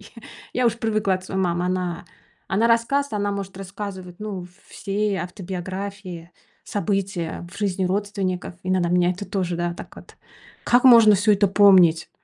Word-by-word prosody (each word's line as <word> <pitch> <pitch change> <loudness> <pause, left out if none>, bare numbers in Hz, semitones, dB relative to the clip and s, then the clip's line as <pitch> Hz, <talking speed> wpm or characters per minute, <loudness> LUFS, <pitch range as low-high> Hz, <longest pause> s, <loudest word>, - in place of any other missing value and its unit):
я 215 +2 -15 0.3
я 250 -1 +2
уж 230 0 0
привыкла 215 -4 0
от 185 0 -6
своей 190 0 -3
мамы. 175 -1 0
Она 180 -2 -2 0.4
она 210 +4 +2
рассказывает, 235 +4 +1
она 205 0 0
может 195 -1 -5
рассказывать, 195 -2 -7
ну, 205 -4 -5
в 175 - -12 0.2
все 200 0 -2
автобиографии, 185 -1 -6 0.3
события 195 -5 -3
в - - -13
жизни 195 -2 -1
родственников. 190 -2 -2
Иногда 185 -1 +1
меня 180 0 +2
это 185 +3 -7
тоже, 180 -4 -2
да, 175 0 -1
так - - -11
вот: - - -15 0.5
"Как 245 +1 +4
можно 230 -4 +8
всё 205 +2 +3
это 200 0 +3
помнить? 185 -5 +5
195 Hz, 160 wpm, -23 LUFS, 180-205 Hz, 0.5 s, можно